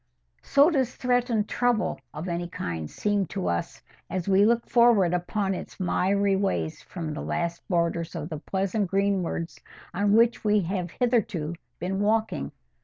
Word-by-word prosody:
So 285 +5 +4
does 260 -5 0
threatened 245 -4 +1
trouble 245 -2 0
of 155 +4 -6
any 175 0 -2
kind 80 - -4
seem 205 -3 0
to 90 - -3
us 85 -1 -3 0.3
as 185 -1 -3
we 195 +1 +5
look 235 +1 +2
forward 235 -7 +4
upon 190 +2 -1
its - - -7
miry 195 +2 +2
ways 85 - -1
from 165 -4 -6
the 150 - -5
last 170 0 -2
borders 170 -1 0
of 155 -1 -4
the 155 -3 -5
pleasant 195 +3 -1
greensward 195 -4 0 0.4
on 200 +2 +2
which 230 +2 +4
we 210 -1 +3
have 180 0 -2
hitherto 195 -9 0 0.3
been 190 +3 -2
walking. 210 - 0
195 Hz, 155 wpm, -26 LUFS, 170-215 Hz, 0.4 s, we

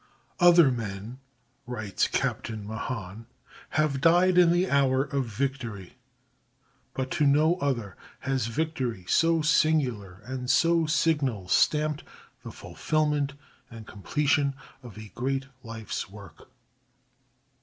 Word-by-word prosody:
_" - - -33 0.4
Other 175 -5 +6
men 115 +1 -6 0.5
[writes 110 -5 -1
Captain 110 -2 -3
Mahan] 110 -1 -6 0.5
have 150 -3 +1
died 175 +3 +4
in 175 -2 +6
the 175 +2 +2
hour 135 -3 +2
of 140 -2 -2
victory, 115 -5 -4 1.0
but 130 -1 -3
to 150 -3 +2
no 155 +5 +3
other 120 - -2 0.3
has 130 -3 -1
victory 125 - -3
so 165 -1 +3
singular 125 - +1
and 125 0 -5
so 165 +1 +3
signal 145 - 0
stamped 150 -1 +2 0.4
the - - -8
fulfilment 150 -2 -1 0.4
and 115 -2 -11
completion 140 +6 0 0.3
of 120 -5 -12
a 110 -1 -9
great 135 +3 -2 0.2
life's 115 -5 -6
work. 100 -1 -14
135 Hz, 115 wpm, -27 LUFS, 110-155 Hz, 1.0 s, Other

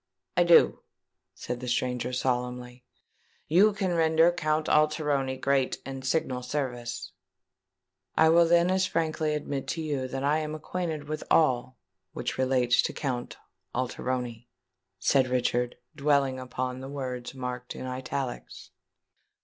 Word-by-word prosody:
"I 175 - +5
do," 170 -1 +6 0.6
said 125 0 -5
the 125 - -6
stranger 125 0 -1
solemnly. 125 -1 -2 0.6
"You 190 +7 +5
can 195 -3 -1
render 165 0 +4
Count 155 -2 0
Alteroni 150 -3 +2
great 135 -1 +1
and 135 -1 -6
signal 130 -2 0
services." 125 -6 -4 1.1
"I 160 0 +6
will 170 +1 +6
then 170 +1 +4
as 190 0 +2
frankly 155 -2 0
admit 145 -2 -4
to 165 - -2
you 140 -4 -2
that 135 +1 -4
I 150 +2 +2
am 155 0 -4
acquainted 160 -1 -4
with 155 0 -4
all 130 -4 +2 0.4
which - - -4
relates 130 -2 +3
to - - -2
Count 125 -4 -3 0.4
Alteroni," 125 -1 -3 0.5
said 130 +7 +3
Richard, 125 -1 0 0.2
dwelling 140 -2 +2
upon 130 0 -4
the 135 +1 -7
words 130 -2 -5
marked 125 -1 -5
in - - -6
italics. 130 - -5
135 Hz, 135 wpm, -28 LUFS, 125-155 Hz, 1.1 s, do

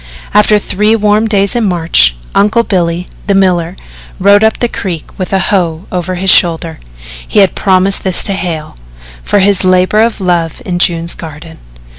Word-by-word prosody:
After 210 0 +4
three 210 +2 0
warm 210 0 +1
days 200 -1 +1
in 235 -2 0
March, 165 - +2 0.2
Uncle 215 +3 +2
Billy, 175 -4 -1 0.2
the 200 - +1
miller, 180 -2 +1 0.4
rode 200 +2 +4
up 220 - +2
the 240 - 0
creek 180 -8 -6
with 185 - -4
a 195 - +2
hoe 180 -3 -1
over 180 0 -3
his 190 +1 +2
shoulder 165 -2 +2 0.5
he - - -4
had 195 - +2
promised 190 0 +1
this 185 -2 +2
to 200 - -1
Hale 170 -5 -5 0.5
for - - 0
his 195 -1 +2
labour 185 +3 +2
of 230 -1 0
love 175 -4 -1
in 175 -1 -3
June's 170 -2 0
garden. 160 0 -11
185 Hz, 170 wpm, -11 LUFS, 170-205 Hz, 0.5 s, After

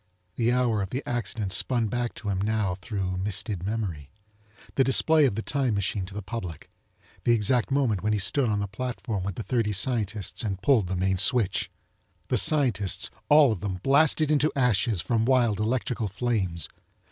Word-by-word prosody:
The 120 0 +1
hour 120 -4 +1
of 95 - -3
the 130 +6 -5
accident 110 -4 -3
spun 120 0 +1
back 120 +1 -3
to 105 - -6
him 95 -1 -1
now 105 -2 0
thru 95 -4 -3
misted 100 0 -1
memory. 95 -9 -4 0.6
The 135 - +3
display 150 +4 +4
of 125 - 0
the 110 - -3
time 135 -6 -1
machine 100 -1 -2
to 100 - -11
the 105 - -5
public. 95 -6 -7 0.5
The 120 - +3
exact 120 +2 +2
moment 130 -8 +1
when 110 +3 0
he 105 - +1
stood 120 +5 +1
on 105 - 0
the 100 - -2
platform 115 -2 -4
with 100 -1 -4
the 115 - -5
thirty 115 -4 -1
scientists 110 -2 -1
and 95 -4 -3
pulled 105 -2 +2
the 95 - -3
main 95 +1 0
switch! 105 -1 +2 0.6
The - - +2
scientists, 125 -11 +2 0.2
all 145 -3 +6
of 105 - -3
them, 95 0 -3
blasted 150 +2 +3
into 150 +1 +2
ashes 115 -6 +1
from 115 -2 0
wild 120 -4 +2
electrical 115 0 -1
flames! 100 -5 -2
110 Hz, 180 wpm, -26 LUFS, 100-125 Hz, 0.6 s, all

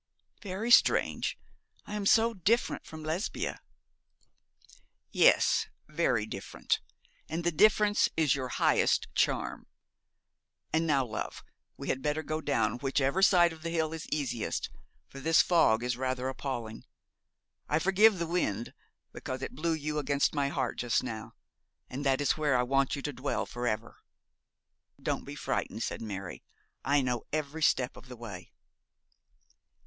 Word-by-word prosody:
'Very 205 +4 -3
strange. - - +4 0.5
I - - -8
am 205 -1 -1
so 230 +2 +5
different 220 +5 0
from 160 -1 -9
Lesbia.' 160 +7 -3 1.5
'Yes, - - +4 0.2
very 150 -8 +1
different, 100 -3 -2 0.5
and 165 +3 -3
the 175 - +2
difference 210 +4 +4
is 155 -4 +3
your 130 -2 -2
highest - - +2
charm. - - 0 1.1
And 160 +1 +2
now, 140 -4 +2
love, 110 - -5 0.3
we - - -6
had 130 - 0
better 150 +3 -1
go 155 0 -3
down 120 -6 0
whichever 135 +5 +1
side 175 -3 +5
of 160 - -13
the 165 - -3
hill 160 -1 -1
is 160 - -6
easiest, 135 -7 -2 0.4
for 135 - -11
this 165 +4 +4
fog 120 -10 +3
is 125 0 -1
rather 130 0 -2
appalling. 120 -5 -5 0.9
I 150 - +3
forgive 195 +5 +4
the 170 - -1
wind, 120 - -1 0.4
because 130 +1 -6
it - - -5
blew 165 +5 -1
you 150 -1 -2
against 140 0 +1
my 140 -2 +1
heart 135 -4 -2
just 120 0 +1
now, 110 -3 -6 0.6
and 135 +3 -4
that 135 0 +2
is 145 - +3
where 150 -4 +2
I 125 - +2
want 135 +1 +1
you 140 - -6
to 145 - -3
dwell 135 +3 -2
for 120 0 -4
ever!' 110 -2 -3 1.0
'Don't - - -2
be - - -7
frightened,' - - -2
said - - -4
Mary. 95 -4 -6 0.4
'I 140 +1 +3
know 125 -2 -1
every 155 +1 -3
step 130 -4 +2
of - - -13
the 125 -1 -10
way.' 100 -7 -9
145 Hz, 150 wpm, -30 LUFS, 125-165 Hz, 1.5 s, so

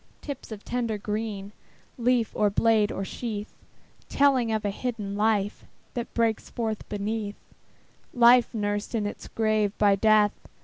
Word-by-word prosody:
Tips 280 -5 -7
of 210 -2 -8
tender 235 -3 -1
green, 210 -1 -4 0.4
Leaf, 245 -2 +1
or 210 -1 +3
blade, 215 0 +3
or 195 - -3
sheath; 215 -1 -5 0.6
Telling 265 -5 +3
of 220 -1 -1
the 205 - 0
hidden 210 -3 -4
life 210 -1 +1 0.3
That 240 -1 -4
breaks 230 -2 0
forth 220 -2 -3
underneath, 210 0 -3 0.8
Life 245 0 +6
nursed 205 +1 -2
in 215 -2 0
its 205 - -6
grave 215 -2 0
by 205 -1 +4
Death. 210 0 +4
215 Hz, 140 wpm, -26 LUFS, 205-230 Hz, 0.8 s, Life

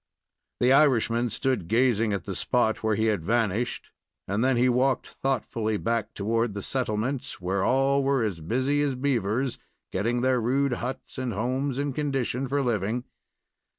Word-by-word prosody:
The 125 +2 +5
Irishman 120 -4 +3
stood 125 -5 -1
gazing 115 -1 +2
at 100 -4 -2
the - - -5
spot 120 -3 +1
where 110 -1 +1
he 110 - +1
had 105 -7 +1
vanished, 115 +2 -1 0.4
and 105 +4 0
then 130 -1 +3
he 125 +1 +4
walked 130 +2 +2
thoughtfully 115 -4 -2
back 115 0 -2
toward 115 +1 0
the 100 - -4
settlement, 125 +1 -1 0.2
where 95 +2 -1
all 135 +3 +3
were 135 -2 +2
as 100 -6 -2
busy 130 - 0
as 140 -3 0
beavers, 125 -1 0 0.3
getting 115 +6 0
their 130 -1 +2
rude 135 +3 +1
huts 130 +2 -5
and 125 -3 -2
homes 130 +5 -1
in 140 0 -1
condition 135 -3 -1
for 140 +2 0
living. 115 0 -1
120 Hz, 160 wpm, -26 LUFS, 110-135 Hz, 0.4 s, The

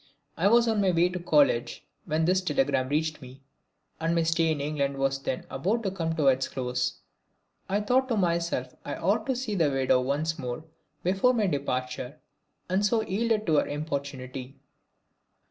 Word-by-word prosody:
I 180 - +2
was 235 +2 +5
on 220 -2 +2
my 195 - +3
way 175 0 +3
to 180 0 -4
college 145 -8 +2 0.2
when 155 +1 0
this 185 +2 +3
telegram 140 -5 +1
reached 155 +1 -1
me 130 +1 -12 0.6
and 165 +1 0
my 170 - +3
stay 165 0 +2
in 155 - -1
England 140 -1 -1
was 135 0 0
then 130 - -3
about 200 - -1
to 195 - -1
come 165 -3 -2
to 155 -3 0
its 130 0 +3
close. 125 -1 -2 0.7
I 200 +2 +1
thought 255 +5 +2
to 235 -4 0
myself 170 -8 0
I 145 - -4
ought 215 +6 0
to 265 - +1
see 240 -4 -3
the 165 -7 +2
widow 130 -2 +2
once 155 +5 -1
more 125 +3 -5 0.4
before 195 +8 +3
my 220 -3 +2
departure, 130 -3 -2 0.5
and 185 +3 +1
so 220 +2 +2
yielded 220 +2 0
to 155 -3 +3
her - - +2
importunity. 140 -3 -5
160 Hz, 180 wpm, -27 LUFS, 135-190 Hz, 0.7 s, was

